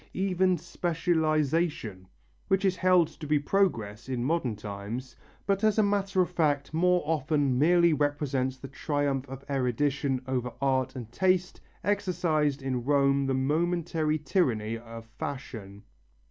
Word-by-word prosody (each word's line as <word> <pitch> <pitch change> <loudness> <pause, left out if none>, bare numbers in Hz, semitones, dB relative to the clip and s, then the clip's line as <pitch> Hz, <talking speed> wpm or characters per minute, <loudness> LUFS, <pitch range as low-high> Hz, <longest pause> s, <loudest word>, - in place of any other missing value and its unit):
Even 185 -1 +2
specialization, 160 - -1 0.4
which 195 +1 +2
is 190 -1 +2
held 180 -3 +4
to 155 -1 -10
be 150 0 +3
progress 135 - 0
in 125 -2 -2
modern 135 -5 0
times, 105 +5 -6 0.3
but 200 +1 0
as 215 -1 +3
a 215 - +5
matter 195 -2 +1
of 180 - -6
fact 150 -4 0
more 180 +2 +3
often 145 -4 +1
merely 170 +2 +5
represents 145 -3 -1
the 135 - -9
triumph 140 -1 -2
of 135 0 -9
erudition 135 0 0
over 125 -2 -2
art 130 -1 0
and 120 -3 -7
taste, 185 +4 +1 0.2
exercised 170 -8 0
in 130 -2 -2
Rome 140 0 +2
the 135 - +1
momentary 160 +2 0
tyranny 125 - 0
of 115 0 -9
fashion. 105 -7 -6
145 Hz, 135 wpm, -28 LUFS, 130-175 Hz, 0.4 s, a